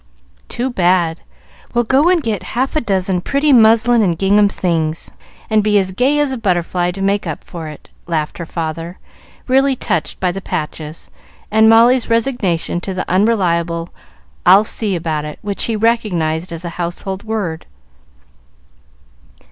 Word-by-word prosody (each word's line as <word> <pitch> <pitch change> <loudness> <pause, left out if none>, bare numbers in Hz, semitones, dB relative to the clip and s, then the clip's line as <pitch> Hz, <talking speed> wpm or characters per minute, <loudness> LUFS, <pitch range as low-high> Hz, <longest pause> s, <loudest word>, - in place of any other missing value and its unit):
"Too 255 +2 -2
bad! 175 -5 +1 0.5
Well, 240 - +3
go 270 +8 +3
and 355 -4 +2
get 215 -5 -2 0.2
half 265 +4 0
a 310 - +2
dozen 190 -4 0
pretty 280 +7 +2
muslin 230 0 +5
and 175 -5 +1
gingham 200 +2 +3
things, 165 -5 -2 0.4
and 215 -1 +2
be 210 0 +3
as 190 -2 +1
gay 260 +9 +1
as 295 -2 +1
a 260 - -4
butterfly, 175 -3 0
to 195 +1 -5
make 200 -1 0
up 160 - -5
for 165 -2 -8
it," 150 -1 -12 0.2
laughed 155 -2 -2
her 170 - -4
father, 165 +2 -5 0.5
really 270 +1 +3
touched 165 -9 -3
by 180 -1 +1
the 195 +2 -6
patches 155 -2 -5 0.4
and 220 +1 +5
Molly's 235 +2 +5
resignation 225 -8 0
to 190 +1 -5
the 185 - -3
unreliable 175 -4 +1 0.5
"I'll 190 +4 +7
see 210 -2 -1
about 160 -3 -2
it," 150 0 -7
which 200 -1 -1
he 230 - -1
recognized 185 -7 0
as 165 +1 -6
a - - -3
household 185 +3 -4
word. 205 -8 -4
195 Hz, 155 wpm, -17 LUFS, 170-230 Hz, 0.5 s, I'll